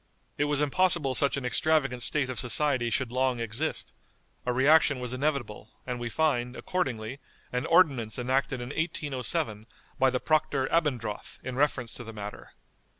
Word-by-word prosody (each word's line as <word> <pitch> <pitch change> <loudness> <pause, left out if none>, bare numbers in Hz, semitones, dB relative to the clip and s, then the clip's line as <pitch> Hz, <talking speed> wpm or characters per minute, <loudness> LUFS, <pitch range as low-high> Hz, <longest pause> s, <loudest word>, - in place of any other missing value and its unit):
It 145 - +1
was 145 0 +1
impossible 150 -2 +2
such 140 +2 +2
an 135 - -4
extravagant 135 -1 +2
state 130 0 +1
of 125 - -4
society 125 0 +2
should 125 0 0
long 130 -1 +1
exist; 115 -1 -2 0.5
a - - +3
reaction 140 +2 +4
was 125 0 -4
inevitable; 130 -6 -2 0.2
and 125 -1 -4
we 120 -1 -3
find, 125 -4 0
accordingly, 130 -8 -3 0.3
an 125 0 -1
ordinance 135 - +3
enacted 130 +1 0
in 120 - -6
1807 130 -8 -2 0.3
by 130 - +5
the 125 - -1
Proctor 145 -3 +1
Abendroth 130 -10 -1
in 130 -1 -5
reference 130 -4 0
to 120 - -8
the 115 -1 -9
matter. 105 -1 -8
130 Hz, 155 wpm, -28 LUFS, 120-145 Hz, 0.5 s, by